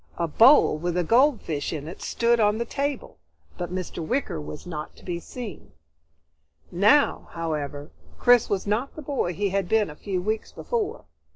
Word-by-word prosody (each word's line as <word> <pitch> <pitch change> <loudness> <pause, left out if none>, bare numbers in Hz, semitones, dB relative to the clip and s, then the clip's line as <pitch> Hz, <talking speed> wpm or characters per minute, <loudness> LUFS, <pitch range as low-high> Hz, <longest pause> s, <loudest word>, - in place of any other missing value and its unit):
A 170 - 0
bowl 225 - +6
with 175 +1 -2
a 180 - +2
goldfish 230 - +2
in 150 -2 -5
it 170 - -9
stood 235 0 +1
on 210 0 +3
the 235 - -2
table, 280 +2 -4 0.4
but 175 -1 -5
Mr. 180 -2 -4
Wicker 240 - -2
was 75 +1 -8
not 155 -4 -6
to - - -17
be 175 -2 -3
seen. 230 +2 -9 1.0
Now, 210 +11 +3
however, 150 -3 -4 0.3
Chris 245 -2 +5
was 195 -2 -1
not 215 +7 -1
the 310 - -8
boy 260 - -2
he 200 +2 0
had 195 -1 -1
been 215 -6 +2
a - - -11
few 190 +2 -3
weeks 215 +4 -2
before. 455 -1 -3
200 Hz, 175 wpm, -25 LUFS, 165-240 Hz, 1.0 s, bowl